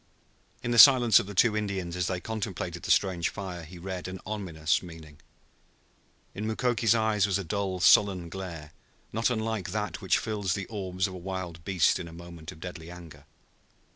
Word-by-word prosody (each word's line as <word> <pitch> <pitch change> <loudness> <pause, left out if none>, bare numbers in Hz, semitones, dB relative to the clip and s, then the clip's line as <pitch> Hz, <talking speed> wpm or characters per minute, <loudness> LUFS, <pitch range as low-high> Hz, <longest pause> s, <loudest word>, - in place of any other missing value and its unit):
In 120 - -2
the 120 - +3
silence 125 -3 +9
of - - -5
the 100 - -8
two 110 +3 +4
Indians 95 -5 -3
as 90 -1 -1
they 90 -2 -2
contemplated 95 -5 -4
the - - -7
strange 90 -4 +2
fire 95 -4 -6
he 85 +3 -11
read 95 +1 -5
an 95 0 -6
ominous 90 -7 -1
meaning. 80 -4 -12 1.1
In 105 +2 -4
Mukoki's 115 0 +2
eyes 110 -3 +2
was 100 -1 +1
a 100 - -4
dull 95 +1 -2
sullen 95 -1 +5
glare, 85 -4 -7 0.4
not 115 +3 +1
unlike 110 -5 -2
that 105 -1 -3
which 95 - +2
fills 105 -5 -2
the 100 - -4
orbs 95 -3 -2
of 95 - -4
a - - -7
wild 90 -2 -6
beast 90 -2 +2
in 85 - -6
a 80 - -11
moment 85 -1 -10
of 80 - -14
deadly 85 -2 -8
anger. 80 -5 -12
95 Hz, 185 wpm, -28 LUFS, 85-105 Hz, 1.1 s, silence